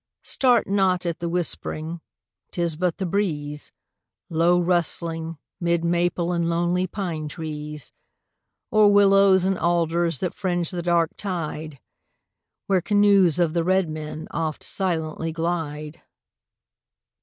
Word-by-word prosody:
Start 250 -3 +3
not 190 -2 +1
at 170 -1 -2
the 170 -1 -3
whispering, 165 -1 -3 0.5
'tis 170 -2 -1
but 175 +1 -1
the 190 - -2
breeze, 150 -6 -2 0.6
Low 170 +2 +3
rustling, 165 -2 0 0.2
'mid 170 -1 0
maple 175 0 0
and 170 -1 0
lonely 175 +2 0
pine 170 -5 -4
trees, 150 -2 -6 0.8
Or 215 -1 +5
willows 195 -2 +5
and 190 -1 0
alders 170 -1 +1
that 180 +6 -3
fringe 175 -3 -1
the 175 -2 -3
dark 170 -1 +1
tide 160 -6 -5 0.9
Where 190 -2 +2
canoes 200 -3 +4
of 170 -3 +1
the 170 -1 +1
red 185 -1 +2
men 155 0 -6
oft 160 -2 -3
silently 165 -3 -1
glide. 160 -2 -4
170 Hz, 120 wpm, -23 LUFS, 160-185 Hz, 0.9 s, Or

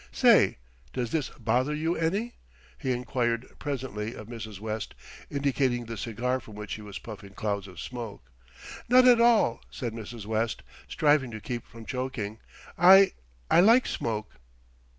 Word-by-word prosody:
"Say, - - +5 0.4
does 120 -2 -2
this 155 -5 -1
bother 125 +6 0
you 160 +3 0
any?" 200 +9 -1 0.5
he 130 -4 -1
enquired 120 -1 -1
presently 125 -6 -4
of 105 - -9
Mrs. 110 -4 -7
West, 110 0 -4 0.3
indicating 135 -4 0
the 115 0 -6
cigar 120 +3 -2
from 110 -3 -13
which 105 -1 -6
he 110 - -6
was 100 -2 -8
puffing 100 -3 -10
clouds 100 -2 -2
of 90 - -11
smoke. 110 - -7 0.6
"Not 255 +1 +7
at 240 -2 +7
all," 225 - +4
said 120 -3 -5
Mrs. 115 -1 -8
West, 110 +1 -1 0.2
striving 145 -4 +2
to 110 -1 -7
keep 120 +2 -5
from 115 -1 -12
choking. 115 -5 -4 0.4
"I 190 +2 +8 0.4
I - - +7
like 230 +7 +6
smoke." 110 -6 -3
120 Hz, 150 wpm, -28 LUFS, 110-145 Hz, 0.6 s, I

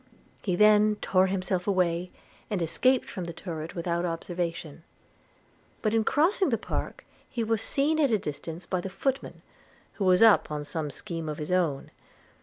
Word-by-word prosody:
He 185 -4 0
then 210 +1 +5
tore 185 0 +3
himself 185 -1 -1
away, 180 -2 +1 0.4
and 205 -4 -1
escaped 255 +10 +2
from 185 - -5
the 170 - -6
turret 165 -2 -6
without 170 0 -1
observation; 170 -2 -4 1.0
but 215 -1 +1
in 225 -1 +3
crossing 350 - +2
the 230 - +1
park - - -5 0.2
he 235 - -2
was 225 -1 0
seen 300 +6 0
at 285 -3 +4
a 220 - +3
distance 165 +1 -6
by 185 0 -1
the 195 - -5
footman, 270 +7 -3 0.5
who 200 - -2
was 185 +3 +5
up 225 -2 +6
on 150 -1 -4
some 150 0 -3
scheme 165 +3 -6
of 150 - -4
his 150 +3 -5
own. 170 -7 0
185 Hz, 170 wpm, -27 LUFS, 165-215 Hz, 1.0 s, up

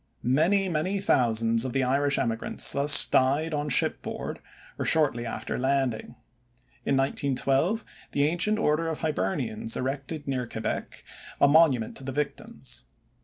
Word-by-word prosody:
Many, 170 +10 +2
many 185 +4 -1
thousands 115 - +1
of 130 -2 -4
the 135 - +1
Irish 140 +2 +1
emigrants 115 -1 0
thus 145 +1 +7
died 145 +5 +1
on 150 0 -2
ship 125 - +1
board - - -6 0.4
or - - -1
shortly 135 -7 +1
after - - -4
landing. 130 -3 -1 0.7
In 135 - +2
1912, 140 - 0 0.3
the 140 - +1
Ancient 175 +7 +1
Order 165 -4 0
of 160 -2 -4
Hibernians 130 - -2
erected 140 +3 -4
near 130 -3 -2
Quebec 110 0 -5 0.4
a - - +5
monument 140 -7 +3
to - - -9
the 135 - -4
victims. 140 +1 -5
140 Hz, 140 wpm, -26 LUFS, 125-155 Hz, 0.7 s, thus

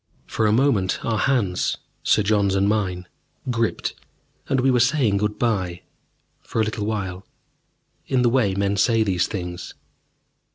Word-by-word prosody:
For 110 - 0
a - - +3
moment 110 -6 +1
our 110 -2 0
hands, 105 -10 +1 0.2
Sir 105 - +3
John's 100 -2 +2
and 95 +1 +2
mine, 95 -4 -1 0.4
gripped, 115 -2 -1 0.6
and 135 - +2
we 130 +1 +3
were 125 - +3
saying 125 -5 +2
good 105 +1 -1
bye 95 -7 -1 0.6
for - - -4
a - - +4
little 110 -1 -3
while 95 -4 -3 0.8
in 130 -2 +2
the 120 - +4
way 115 -6 +2
men 100 0 0
say 115 +2 +3
these 90 -4 +1
things. 90 -3 -6
105 Hz, 155 wpm, -23 LUFS, 95-115 Hz, 0.8 s, a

